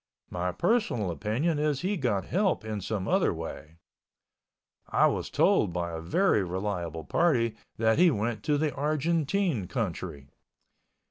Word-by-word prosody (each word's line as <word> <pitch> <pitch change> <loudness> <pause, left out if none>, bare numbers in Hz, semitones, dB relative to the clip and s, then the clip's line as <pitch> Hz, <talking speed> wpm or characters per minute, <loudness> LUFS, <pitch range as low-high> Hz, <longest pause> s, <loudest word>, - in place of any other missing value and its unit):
My 90 +1 -1
personal 120 - 0
opinion 125 - -1
is 150 -2 0
he 195 +3 0
got 115 - 0
help 190 - 0
in 105 -2 -3
some 100 -1 -3
other - - +3
way. 80 +2 -7 1.1
I - - +4
was - - 0
told - - +3
by 85 -1 -2
a 80 -1 -5
very 105 - +2
reliable 90 -3 -3
party 115 - +2 0.2
that 110 +4 +2
he 180 0 +7
went 110 -4 -1
to 150 -1 +2
the 150 0 0
Argentine 155 - 0
country. 85 - -4
110 Hz, 140 wpm, -28 LUFS, -, 1.1 s, he